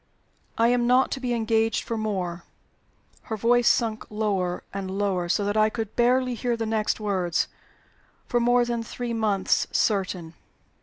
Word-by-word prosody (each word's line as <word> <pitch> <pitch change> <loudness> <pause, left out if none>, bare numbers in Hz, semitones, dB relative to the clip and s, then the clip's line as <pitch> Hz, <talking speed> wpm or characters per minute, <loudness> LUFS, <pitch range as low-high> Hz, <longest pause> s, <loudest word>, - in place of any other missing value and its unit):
I 230 +1 +4
am 240 -1 +2
not 255 +2 +4
to 270 - -2
be 250 -1 -2
engaged 225 0 +1
for 230 - -3
more" 185 -6 -3 0.8
her 220 - -4
voice 240 +3 +3
sunk 225 -2 +1
lower 200 -4 -1
and 195 -1 -4
lower, 190 -3 -1
so 205 +3 +1
that 205 +1 -1
I 215 0 +4
could 220 -2 -5
barely 250 +1 +2
hear 240 0 -1
the 225 - -2
next 220 0 0
words 185 -5 0 0.8
"for 240 - +1
more 245 +1 +3
than 235 -1 -2
three 235 +1 -5
months, 210 -4 +1
certain." 185 -5 0
220 Hz, 160 wpm, -25 LUFS, 195-240 Hz, 0.8 s, I